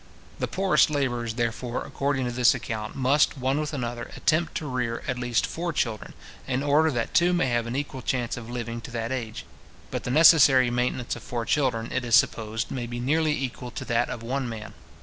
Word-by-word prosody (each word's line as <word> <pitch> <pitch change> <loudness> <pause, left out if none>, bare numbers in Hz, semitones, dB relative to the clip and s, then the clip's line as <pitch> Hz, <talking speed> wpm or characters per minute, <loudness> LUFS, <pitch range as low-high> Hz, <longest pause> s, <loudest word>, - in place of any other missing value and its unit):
The - - -1
poorest 190 -4 +3
labourers, 120 -6 -1
therefore, 120 +1 -2
according 140 -2 -1
to 120 - -2
this 125 +1 +4
account, 110 -3 -5
must, 140 +3 +2
one 135 +2 0
with 155 -1 -2
another, 120 -4 -4
attempt 160 +2 +1
to 155 - -3
rear 125 -4 -2
at 125 -1 -2
least 120 -2 +1
four 170 +1 -3
children, 115 -8 -2 0.3
in 130 +1 -1
order 150 +2 +4
that 120 -6 -2
two 175 +1 +4
may 175 -5 +2
have 120 -1 0
an 120 - -4
equal 140 -2 -4
chance 125 -1 -1
of 115 -1 -8
living 120 -1 -4
to - - -9
that 115 0 -3
age. 115 -4 -4 0.5
But - - -3
the - - -4
necessary 135 -4 +6
maintenance 125 0 -1
of - - -9
four 120 -2 -4
children, 120 -6 0
it 130 - -1
is 120 -1 +3
supposed, 110 -4 +1
may 120 -2 -3
be 120 0 -5
nearly 155 +5 +1
equal 125 -1 -4
to - - -7
that 120 +1 +1
of 115 - -6
one 130 +1 -2
man. 110 -2 -7
125 Hz, 210 wpm, -26 LUFS, 120-140 Hz, 0.5 s, necessary